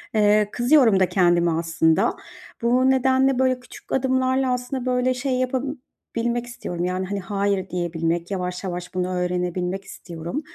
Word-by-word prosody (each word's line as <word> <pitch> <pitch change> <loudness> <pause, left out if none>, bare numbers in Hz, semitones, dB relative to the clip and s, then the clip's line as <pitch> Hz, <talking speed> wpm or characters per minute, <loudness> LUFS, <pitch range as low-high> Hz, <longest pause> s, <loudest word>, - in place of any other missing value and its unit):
Eee, 210 0 +4
kızıyorum 245 -5 +4
da 185 - +3
kendime 175 -2 +3
aslında. 165 0 +1 0.5
Bu 250 +3 +3
nedenle 265 0 +3
böyle 255 -1 +2
küçük 250 - -14
adımlarla 260 0 +1
aslında 250 +1 -3
böyle 250 0 +1
şey 260 +1 -2
yapabilmek 250 -2 -3
istiyorum; 180 -7 -5
yani, 185 +1 -2
hani, 200 +1 -3
"hayır" 195 0 -1
diyebilmek, 170 0 -2
yavaş 180 -1 -3
yavaş 180 0 -5
bunu 185 0 -1
öğrenebilmek 180 +1 -2
istiyorum. 170 - -6
205 Hz, 135 wpm, -23 LUFS, 180-255 Hz, 0.5 s, Eee